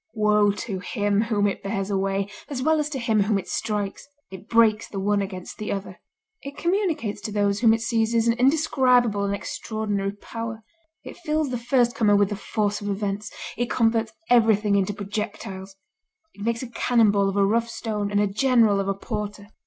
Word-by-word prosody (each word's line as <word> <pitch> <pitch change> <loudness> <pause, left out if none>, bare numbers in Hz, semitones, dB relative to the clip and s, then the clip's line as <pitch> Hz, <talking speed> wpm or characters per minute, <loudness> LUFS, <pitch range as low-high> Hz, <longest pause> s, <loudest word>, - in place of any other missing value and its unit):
Woe 210 -1 +3
to 200 -1 -3
him 205 +1 0
whom 210 -3 +1
it 200 - -1
bears 195 0 -3
away 195 0 0 0.2
as 260 -3 -3
well 315 +1 +3
as 300 0 -1
to 290 - -4
him 225 -4 +1
whom 205 +1 +2
it 190 - -5
strikes! 205 +2 -3 0.2
It 190 +3 -11
breaks 230 -2 +4
the 195 - -5
one 205 +1 +1
against 190 -2 -7
the 215 - -3
other. 195 -2 -5 0.4
It 280 +1 -9
communicates 340 - -1
to 215 - -5
those 205 -1 +1
whom 230 -2 +5
it 225 0 +1
seizes 230 0 +1
an 230 - +4
indescribable 250 -7 +3
and 200 0 0
extraordinary 205 -1 -3
power. 225 +1 -7 0.4
It - - -10
fills 310 -4 -1
the 245 - -1
firstcomer 235 -4 +2
with 200 -1 +3
the 205 - -3
force 210 0 -2
of 205 - -4
events; 205 +1 -3 0.2
it 240 +1 -2
converts 225 -1 +1 0.2
everything 220 -4 +4
into 195 0 +1
projectiles. 200 -1 -5 0.6
It 200 - -14
makes 230 +3 -1
a 250 - -7
cannon 230 -2 +3
ball 200 -1 +2
of 195 - -3
a 200 - +4
rough 230 +3 +1
stone, 210 -3 -3
and 205 0 +1
a 205 - +3
general 220 -1 +3
of 195 - -2
a 195 - 0
porter. 205 0 -5
210 Hz, 190 wpm, -24 LUFS, 200-235 Hz, 0.6 s, whom